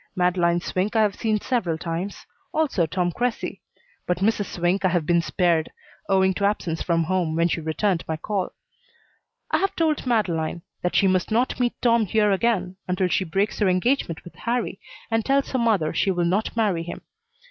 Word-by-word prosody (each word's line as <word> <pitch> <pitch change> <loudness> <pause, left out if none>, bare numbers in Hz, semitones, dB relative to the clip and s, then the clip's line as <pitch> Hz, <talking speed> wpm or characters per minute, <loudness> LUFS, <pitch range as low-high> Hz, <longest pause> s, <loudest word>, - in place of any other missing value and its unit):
Madeleine 175 -1 +2
Swink 185 +5 -2
I 220 - +5
have 205 -2 +1
seen 215 +1 0
several 195 -10 -1
times, 170 +4 -4 0.3
also 275 - +1
Tom 175 +2 0
Cressy, 245 +5 -2 0.5
but 180 - +1
Mrs. 205 +2 +1
Swink 175 +3 0
I - - +5
have 175 -3 0
been 170 +1 +3
spared, 170 -2 +1 0.4
owing 190 -1 +4
to 200 - -4
absence 180 -5 -1
from 165 -1 +1
home 170 -2 0
when 165 +1 +3
she 165 - -2
returned 165 +3 0
my 160 - -2
call. 195 +3 -2 1.0
I - - +3
have 390 - 0
told 310 -5 0
Madeleine 170 -8 0 0.2
that 180 - -1
she - - +4
must 185 -2 +2
not 240 +4 +1
meet 245 -1 0
Tom 230 -3 +3
here 210 +2 +3
again 190 -3 0
until 180 0 +1
she 190 - +1
breaks 195 +5 -1
her 205 -3 +3
engagement 185 -2 0
with 175 - -12
Harrie 235 -4 -2 0.3
and 225 0 +2
tells 275 +2 +1
her 260 - 0
mother 210 -10 +2
she 200 - +1
will 175 -2 +1
not 200 +6 0
marry 200 -7 +1
him. 170 +1 -7
185 Hz, 190 wpm, -24 LUFS, 175-220 Hz, 1.0 s, I